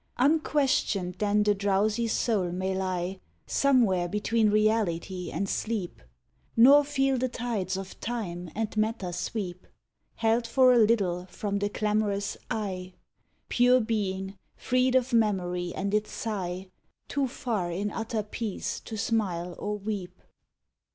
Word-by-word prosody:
Unquestioned 270 Hz, -, +2 dB
then 210 Hz, 0 st, +2 dB
the 210 Hz, 0 st, +3 dB
drowsy 205 Hz, +3 st, +1 dB
soul 210 Hz, -5 st, 0 dB
may 185 Hz, +2 st, -2 dB
lie, 185 Hz, 0 st, -2 dB, 0.3 s
Somewhere 230 Hz, -11 st, +3 dB
between 210 Hz, +3 st, +1 dB
reality 205 Hz, -4 st, +1 dB
and 200 Hz, -, -2 dB
sleep, 210 Hz, -, -3 dB, 0.6 s
Nor 275 Hz, +5 st, +8 dB
feel 270 Hz, -2 st, +1 dB
the 255 Hz, +1 st, 0 dB
tides 215 Hz, -6 st, -2 dB
of 190 Hz, -1 st, -8 dB
Time 180 Hz, -7 st, -4 dB
and 220 Hz, 0 st, -2 dB
matter 215 Hz, -4 st, -1 dB
sweep 180 Hz, 0 st, -4 dB, 0.5 s
Held 230 Hz, +1 st, +1 dB
for 255 Hz, +2 st, +5 dB
a 240 Hz, -, +5 dB
little 195 Hz, -5 st, +2 dB
from 200 Hz, +2 st, -3 dB
the 205 Hz, 0 st, 0 dB
clamorous 205 Hz, -1 st, 0 dB
"I", 185 Hz, -4 st, -3 dB, 0.5 s
Pure 250 Hz, +1 st, +4 dB
being, 195 Hz, -3 st, -2 dB, 0.2 s
freed 255 Hz, +1 st, +1 dB
of 255 Hz, -1 st, +2 dB
memory 180 Hz, -6 st, +1 dB
and 200 Hz, +1 st, -2 dB
its 210 Hz, 0 st, 0 dB
sigh, 190 Hz, -4 st, -4 dB, 0.4 s
Too 280 Hz, -1 st, 0 dB
far 230 Hz, -8 st, -2 dB
in 200 Hz, +4 st, -2 dB
utter 225 Hz, -1 st, -2 dB
peace 210 Hz, -1 st, -4 dB
to 220 Hz, -, -7 dB
smile 185 Hz, -6 st, -1 dB
or 210 Hz, 0 st, -2 dB
weep. 195 Hz, -3 st, -5 dB
210 Hz, 130 wpm, -28 LUFS, 190-230 Hz, 0.6 s, Nor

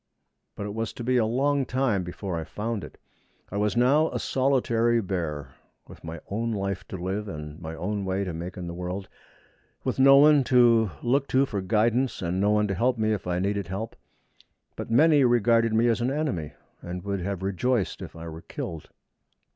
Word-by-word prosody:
But 100 Hz, -, -5 dB
it 100 Hz, -, -5 dB
was 110 Hz, 0 st, -3 dB
to -, -, -7 dB
be 125 Hz, +1 st, +2 dB
a 110 Hz, -3 st, +3 dB
long 140 Hz, +4 st, +1 dB
time 125 Hz, -7 st, 0 dB
before 90 Hz, +1 st, -5 dB
I 80 Hz, -, -3 dB
found 105 Hz, +6 st, -4 dB
it. -, -, -11 dB, 0.5 s
I 100 Hz, -, -3 dB
was 105 Hz, +3 st, 0 dB
now 140 Hz, +6 st, +4 dB
a -, -, -3 dB
solitary 120 Hz, -3 st, +2 dB
bear, 85 Hz, -8 st, -3 dB, 0.4 s
with -, -, -14 dB
my 80 Hz, 0 st, -6 dB
own 115 Hz, +3 st, -1 dB
life 100 Hz, -2 st, -3 dB
to 95 Hz, -, -6 dB
live 95 Hz, +4 st, -3 dB
and 75 Hz, -3 st, -7 dB
my 80 Hz, -1 st, -6 dB
own 100 Hz, +5 st, -3 dB
way 95 Hz, +1 st, -1 dB
to 90 Hz, -3 st, -4 dB
make 85 Hz, +3 st, -6 dB
in 90 Hz, -, -5 dB
the 85 Hz, -, -5 dB
world, 90 Hz, +2 st, -5 dB, 0.8 s
with -, -, -2 dB
no 135 Hz, +1 st, +8 dB
one 145 Hz, 0 st, +6 dB
to 120 Hz, -4 st, +5 dB
look 135 Hz, +3 st, +1 dB
to 135 Hz, +1 st, +3 dB
for 105 Hz, -7 st, -3 dB
guidance 115 Hz, +4 st, +1 dB
and 90 Hz, +2 st, -1 dB
no 100 Hz, -, +3 dB
one 105 Hz, 0 st, +3 dB
to -, -, 0 dB
help 120 Hz, +6 st, +1 dB
me 110 Hz, 0 st, +1 dB
if 100 Hz, -3 st, -4 dB
I 90 Hz, 0 st, 0 dB
needed 100 Hz, 0 st, -1 dB
help; 100 Hz, +5 st, -5 dB, 0.8 s
but -, -, -6 dB
many 145 Hz, +4 st, +5 dB
regarded 115 Hz, -1 st, +3 dB
me 115 Hz, +2 st, +3 dB
as 115 Hz, 0 st, +1 dB
an 120 Hz, -, +1 dB
enemy, 135 Hz, -, -2 dB, 0.3 s
and 90 Hz, 0 st, -6 dB
would 100 Hz, -1 st, -2 dB
have 95 Hz, 0 st, -3 dB
rejoiced 100 Hz, +3 st, 0 dB
if -, -, -8 dB
I 85 Hz, 0 st, -8 dB
were 80 Hz, 0 st, -8 dB
killed. 80 Hz, -2 st, -7 dB
105 Hz, 205 wpm, -26 LUFS, 90-120 Hz, 0.8 s, no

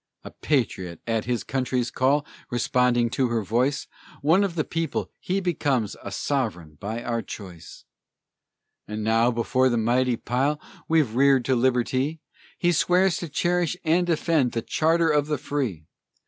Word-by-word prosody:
A -, -, -9 dB
patriot, 95 Hz, -, -1 dB
at 115 Hz, -2 st, -1 dB
his 120 Hz, -2 st, -1 dB
country's 125 Hz, -1 st, -1 dB
call, 140 Hz, +3 st, +2 dB, 0.2 s
Responding 120 Hz, -1 st, +2 dB
to 130 Hz, 0 st, +1 dB
her 115 Hz, -2 st, -1 dB
voice; 125 Hz, +8 st, 0 dB, 0.4 s
One 165 Hz, +7 st, +4 dB
of 190 Hz, -4 st, -2 dB
the 155 Hz, -, +1 dB
people, 165 Hz, +1 st, -3 dB
he 190 Hz, +2 st, -1 dB
becomes 140 Hz, -, 0 dB
A 100 Hz, -, -7 dB
sovereign 100 Hz, -, -2 dB
by 110 Hz, +5 st, -4 dB
our 115 Hz, -1 st, -1 dB
choice! 90 Hz, -8 st, -10 dB, 1.0 s
And 105 Hz, 0 st, -4 dB
now, 115 Hz, +2 st, +3 dB
before 125 Hz, +2 st, +2 dB
the 120 Hz, -, +1 dB
mighty 120 Hz, +2 st, +2 dB
pile 135 Hz, +7 st, 0 dB, 0.3 s
We've 155 Hz, -8 st, +2 dB
reared 135 Hz, 0 st, +4 dB
to 130 Hz, -, +2 dB
Liberty, 130 Hz, +4 st, +1 dB, 0.4 s
He 175 Hz, -, +2 dB
swears 180 Hz, +2 st, +3 dB
to 170 Hz, -, -5 dB
cherish 175 Hz, +3 st, 0 dB
and 175 Hz, +3 st, +2 dB
defend 160 Hz, -6 st, +1 dB
The 115 Hz, -, -2 dB
charter 165 Hz, +1 st, +2 dB
of 150 Hz, -1 st, +2 dB
the 150 Hz, -1 st, 0 dB
free! 120 Hz, -, -3 dB
130 Hz, 155 wpm, -25 LUFS, 115-155 Hz, 1.0 s, One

